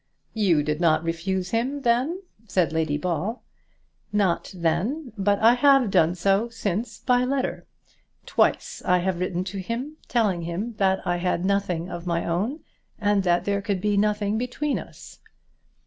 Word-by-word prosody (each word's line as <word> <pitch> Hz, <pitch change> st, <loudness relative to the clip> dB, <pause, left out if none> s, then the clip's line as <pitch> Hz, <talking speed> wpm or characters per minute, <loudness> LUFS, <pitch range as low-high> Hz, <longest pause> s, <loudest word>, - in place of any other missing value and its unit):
"You 185 Hz, -9 st, +2 dB
did 150 Hz, +2 st, -2 dB
not 160 Hz, -1 st, +3 dB
refuse 180 Hz, +3 st, -2 dB
him, 260 Hz, +5 st, -1 dB
then?" 265 Hz, +11 st, +1 dB, 0.2 s
said 175 Hz, -6 st, +1 dB
Lady 160 Hz, -2 st, 0 dB
Ball. 180 Hz, +8 st, -2 dB, 0.7 s
"Not 200 Hz, -4 st, +1 dB
then, 190 Hz, -, -1 dB
but 200 Hz, 0 st, +2 dB
I 225 Hz, +3 st, +6 dB
have 270 Hz, -3 st, +4 dB
done 165 Hz, 0 st, +3 dB
so 195 Hz, +5 st, +1 dB
since 220 Hz, -1 st, -3 dB
by 250 Hz, -1 st, +3 dB
letter. 265 Hz, +1 st, -2 dB, 0.6 s
Twice -, -, +1 dB
I 180 Hz, -, +3 dB
have 180 Hz, 0 st, -1 dB
written 180 Hz, 0 st, -1 dB
to 195 Hz, +1 st, -5 dB
him, 245 Hz, +10 st, -4 dB
telling 210 Hz, -8 st, +1 dB
him 175 Hz, +8 st, -4 dB
that 190 Hz, -1 st, +1 dB
I 175 Hz, 0 st, 0 dB
had 180 Hz, 0 st, -1 dB
nothing 190 Hz, -4 st, 0 dB
of 175 Hz, -1 st, -7 dB
my 170 Hz, -1 st, 0 dB
own, 210 Hz, -, -1 dB, 0.4 s
and 205 Hz, -2 st, +2 dB
that 175 Hz, -2 st, +1 dB
there 200 Hz, 0 st, 0 dB
could 200 Hz, -2 st, -1 dB
be 205 Hz, +2 st, 0 dB
nothing 210 Hz, +1 st, +1 dB
between 250 Hz, +4 st, -2 dB
us." -, -, -12 dB
195 Hz, 160 wpm, -25 LUFS, 175-230 Hz, 0.7 s, I